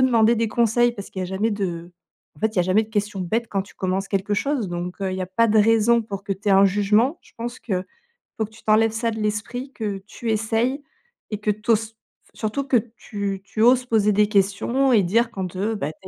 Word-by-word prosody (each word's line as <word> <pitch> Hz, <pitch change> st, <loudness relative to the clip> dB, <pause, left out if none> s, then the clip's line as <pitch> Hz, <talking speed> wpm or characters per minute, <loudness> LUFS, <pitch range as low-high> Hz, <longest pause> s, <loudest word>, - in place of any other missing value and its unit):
demander 235 Hz, -3 st, +4 dB
des 225 Hz, -1 st, 0 dB
conseils 235 Hz, +1 st, +2 dB
parce 200 Hz, -3 st, -9 dB
qu'il 190 Hz, -, -6 dB
y -, -, -1 dB
a -, -, -3 dB
jamais 190 Hz, +5 st, -1 dB
de 175 Hz, -4 st, -4 dB, 0.4 s
en -, -, -18 dB
fait, 220 Hz, -, +2 dB
il -, -, -14 dB
y -, -, +3 dB
a -, -, +3 dB
jamais 185 Hz, +5 st, +3 dB
de 215 Hz, -, -10 dB
question 205 Hz, -2 st, -2 dB
bête, 225 Hz, +6 st, -1 dB
quand 195 Hz, -, -1 dB
tu 200 Hz, -, -18 dB
commences 190 Hz, +1 st, -2 dB
quelque 200 Hz, +1 st, -1 dB
chose. 230 Hz, -1 st, -1 dB
Donc, 175 Hz, +2 st, -5 dB
heu, 190 Hz, -, -1 dB
il -, -, -3 dB
y -, -, -3 dB
a -, -, -4 dB
pas 230 Hz, +6 st, +2 dB
de 220 Hz, 0 st, +3 dB
raison 225 Hz, +2 st, +4 dB
pour 200 Hz, -2 st, -6 dB
que 200 Hz, -, -1 dB
tu 200 Hz, +2 st, -4 dB
aies -, -, +4 dB
un 195 Hz, +1 st, +6 dB
jugement. 210 Hz, -, +2 dB
Je -, -, -22 dB
pense 240 Hz, +1 st, -5 dB
qu'il 185 Hz, -4 st, -3 dB, 0.5 s
faut 220 Hz, -, 0 dB
que 215 Hz, -, -16 dB
tu 220 Hz, 0 st, -17 dB
t'enlèves 220 Hz, +1 st, +4 dB
ça 230 Hz, +1 st, -1 dB
de 220 Hz, -, -5 dB
l'esprit, 220 Hz, +5 st, -3 dB
que 205 Hz, -4 st, -4 dB
tu 230 Hz, +2 st, -6 dB
essayes 225 Hz, +6 st, 0 dB, 0.5 s
et 210 Hz, -, -2 dB
que 210 Hz, 0 st, +1 dB
tu 215 Hz, +3 st, -1 dB
oses 225 Hz, 0 st, +1 dB
faut -, -, -46 dB, 0.4 s
surtout 230 Hz, +6 st, -2 dB
que 265 Hz, -, +1 dB, 0.2 s
tu 200 Hz, -3 st, -4 dB
tu 215 Hz, -, -4 dB
oses 250 Hz, +2 st, +5 dB
poser 215 Hz, -3 st, +2 dB
des 210 Hz, +1 st, +3 dB
questions 210 Hz, +6 st, +1 dB
et 215 Hz, -, +6 dB
dire 230 Hz, +6 st, +2 dB
quand, 185 Hz, -3 st, -5 dB
heu, 210 Hz, +4 st, -1 dB
bah, 155 Hz, -7 st, -3 dB
tu -, -, -32 dB
215 Hz, 260 wpm, -23 LUFS, 195-230 Hz, 0.5 s, un